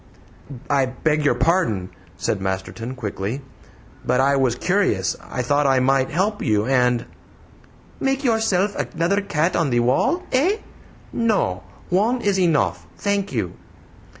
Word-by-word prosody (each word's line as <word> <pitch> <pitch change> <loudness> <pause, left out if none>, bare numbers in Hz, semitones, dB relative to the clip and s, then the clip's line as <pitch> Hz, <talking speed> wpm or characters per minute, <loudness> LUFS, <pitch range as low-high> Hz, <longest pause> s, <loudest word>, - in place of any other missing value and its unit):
"I 140 -2 +2
beg 150 +4 0
your 145 - +3
pardon," 110 - +1 0.3
said 100 - -1
Masterton 95 +6 -4
quickly, 110 +2 -4 0.6
"but 125 - +1
I 140 +1 +3
was 130 -3 +2
curious. 150 - +1
I 125 - -4
thought 145 +3 +2
I 135 -1 +4
might 135 +1 +2
help 195 +7 0
you, 105 -1 +1
and 125 -2 +2 0.5
" - - -27
"Make 270 +1 0
yourself 215 -5 +1
another 170 +5 0
cat 170 -3 0
on 165 -4 +1
the 120 -1 +2
wall, 260 - +2
eh? 335 +12 +2 0.6
No; 205 - +1 0.3
one 215 +8 +2
is 200 -3 +1
enough, 95 - +1
thank 200 -1 -1
you!" 105 -8 -2
140 Hz, 140 wpm, -22 LUFS, 120-200 Hz, 0.6 s, I